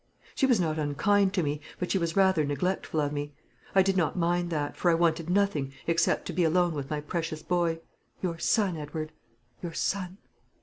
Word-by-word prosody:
She 270 - +2
was 245 -6 +4
not 160 -3 0
unkind 190 +7 +2
to 180 - +2
me, 145 0 -2 0.2
but 180 - -3
she 195 - +2
was 170 -1 -1
rather 190 -5 +4
neglectful 155 +3 -1
of 145 -1 0
me. 145 0 -4 0.4
I 190 - +7
did 195 0 +1
not 175 -1 +1
mind 175 0 +1
that, 150 -3 -2
for 175 - +1
I 165 - +5
wanted 165 0 +1
nothing 180 -8 +1
except 165 0 +2
to - - -4
be 175 +2 +2
alone 175 +1 +3
with 140 -3 -5
my 150 -1 -2
precious 160 0 -4
boy 170 -2 0 0.4
your 170 -3 -3
son, 195 -5 +2
Edward; 155 +1 -5 0.5
your 170 -2 -5
son. 185 +2 -2
170 Hz, 200 wpm, -28 LUFS, 155-185 Hz, 0.5 s, I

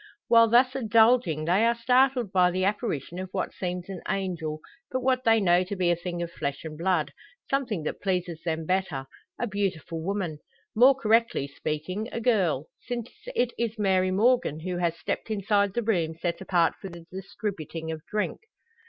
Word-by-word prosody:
While 230 -1 +7
thus 250 +3 +4
indulging 225 - +3
they 185 +6 +3
are 235 +1 +3
startled 250 -2 +3
by 180 -2 +4
the 185 +1 0
apparition 190 - -2
of 185 0 -5
what 185 - -2
seems 180 -1 -4
an 190 -3 -7
angel, 170 -6 -2 0.3
but 255 - -2
what 255 0 +2
they 225 0 +5
know 180 -2 +4
to 200 - -4
be 180 -2 +2
a - - +3
thing 175 0 -4
of 170 - -6
flesh 140 -4 -4
and 160 -1 -7
blood 165 -3 0 0.4
something 245 - 0
that - - -4
pleases 180 -4 -2
them 160 -2 -2
better 180 -7 -1 0.3
a - - 0
beautiful 190 -6 -3
woman. 180 -4 -3 0.4
More 255 +5 +7
correctly 230 - +2
speaking 160 - -4
a - - -3
girl; 190 - +1
since 245 -1 -5 0.2
it 245 -1 +1
is 230 -1 -1
Mary 190 -3 +2
Morgan 200 - +2
who 180 +1 -3
has 170 -1 0
stepped - - -4
inside 200 -1 +1
the 240 - 0
room 170 -7 0
set 170 0 -2
apart 175 -3 +2
for 195 - -6
the 170 -1 -11
distributing 185 -4 -5
of 155 -1 -6
drink. 210 0 -2
190 Hz, 180 wpm, -27 LUFS, 170-225 Hz, 0.4 s, While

